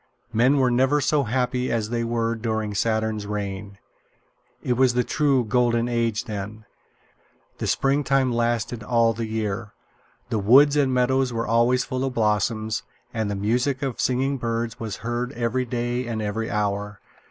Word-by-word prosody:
Men 125 Hz, +6 st, +4 dB
were 130 Hz, -2 st, +3 dB
never 130 Hz, +4 st, +3 dB
so 145 Hz, -1 st, +1 dB
happy 125 Hz, +1 st, -1 dB
as 115 Hz, -1 st, -1 dB
they 120 Hz, -1 st, 0 dB
were 115 Hz, 0 st, 0 dB
during 110 Hz, -2 st, -2 dB
Saturn's 110 Hz, 0 st, -1 dB
reign. 100 Hz, -1 st, -5 dB, 0.9 s
It 125 Hz, -, +1 dB
was 125 Hz, 0 st, +3 dB
the 125 Hz, -, +3 dB
true 140 Hz, -4 st, +1 dB
Golden 120 Hz, +1 st, +2 dB
Age 115 Hz, -2 st, 0 dB
then. 105 Hz, +1 st, -6 dB, 0.9 s
The -, -, -2 dB
springtime 135 Hz, -2 st, +2 dB
lasted 120 Hz, -1 st, -1 dB
all 115 Hz, +1 st, +2 dB
the 115 Hz, 0 st, -4 dB
year. 110 Hz, -1 st, -3 dB, 0.6 s
The 110 Hz, -, 0 dB
woods 135 Hz, +8 st, +6 dB
and 140 Hz, -3 st, +2 dB
meadows 130 Hz, +1 st, +2 dB
were 115 Hz, 0 st, -2 dB
always 120 Hz, +2 st, +2 dB
full 130 Hz, -1 st, -3 dB
of 135 Hz, -1 st, -2 dB
blossoms, 110 Hz, 0 st, 0 dB, 0.3 s
and 110 Hz, -3 st, -1 dB
the 105 Hz, -, -2 dB
music 125 Hz, +7 st, 0 dB
of 135 Hz, -4 st, -2 dB
singing 135 Hz, +2 st, 0 dB
birds 115 Hz, -1 st, -2 dB
was 110 Hz, -3 st, -4 dB
heard 120 Hz, +2 st, -2 dB
every 120 Hz, +1 st, -1 dB
day 120 Hz, 0 st, -2 dB
and 115 Hz, -2 st, -3 dB
every 110 Hz, +2 st, -2 dB
hour. 105 Hz, -1 st, -2 dB
115 Hz, 160 wpm, -24 LUFS, 110-125 Hz, 0.9 s, woods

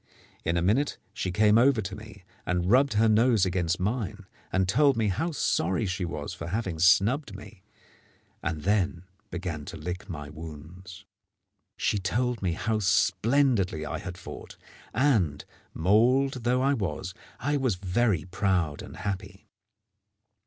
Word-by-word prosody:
In 85 Hz, +2 st, 0 dB
a 85 Hz, -, +1 dB
minute 125 Hz, +11 st, +1 dB, 0.2 s
she 95 Hz, -, -3 dB
came 105 Hz, +3 st, +4 dB
over 130 Hz, -1 st, +4 dB
to 95 Hz, -2 st, -4 dB
me 105 Hz, -2 st, -12 dB, 0.2 s
and 90 Hz, +1 st, 0 dB
rubbed 130 Hz, 0 st, +4 dB
her 110 Hz, +2 st, +4 dB
nose 110 Hz, -1 st, +4 dB
against 90 Hz, -2 st, 0 dB
mine, 105 Hz, 0 st, -2 dB, 0.3 s
and 95 Hz, 0 st, +1 dB
told 135 Hz, +6 st, +3 dB
me 110 Hz, -2 st, +1 dB
how 140 Hz, -, -1 dB
sorry 110 Hz, -, 0 dB
she 90 Hz, -1 st, -2 dB
was 75 Hz, -4 st, -5 dB
for 85 Hz, -, -7 dB
having 95 Hz, -3 st, -3 dB
snubbed 100 Hz, -, +3 dB
me, 100 Hz, 0 st, -12 dB, 0.8 s
and 75 Hz, -2 st, -3 dB
then 95 Hz, -3 st, +1 dB, 0.3 s
began 85 Hz, -5 st, -4 dB
to -, -, -7 dB
lick 90 Hz, +4 st, -6 dB
my 75 Hz, -4 st, -6 dB
wounds. 80 Hz, +4 st, -10 dB, 0.7 s
She 105 Hz, -, 0 dB
told 120 Hz, +5 st, -1 dB
me 90 Hz, -3 st, 0 dB
how 110 Hz, +5 st, -1 dB
splendidly 100 Hz, -, +2 dB
I 80 Hz, +2 st, -4 dB
had 90 Hz, -1 st, -7 dB
fought; 95 Hz, -, -10 dB, 0.3 s
and, 110 Hz, -, +1 dB, 0.3 s
mauled 120 Hz, +8 st, +2 dB
though 125 Hz, +2 st, +2 dB
I 140 Hz, +1 st, +3 dB
was, 95 Hz, -, -3 dB, 0.3 s
I 145 Hz, +2 st, 0 dB
was 130 Hz, -7 st, +1 dB
very 95 Hz, -2 st, 0 dB
proud 90 Hz, -5 st, 0 dB
and -, -, -10 dB
happy. 95 Hz, -1 st, -5 dB
95 Hz, 150 wpm, -27 LUFS, 90-115 Hz, 0.8 s, came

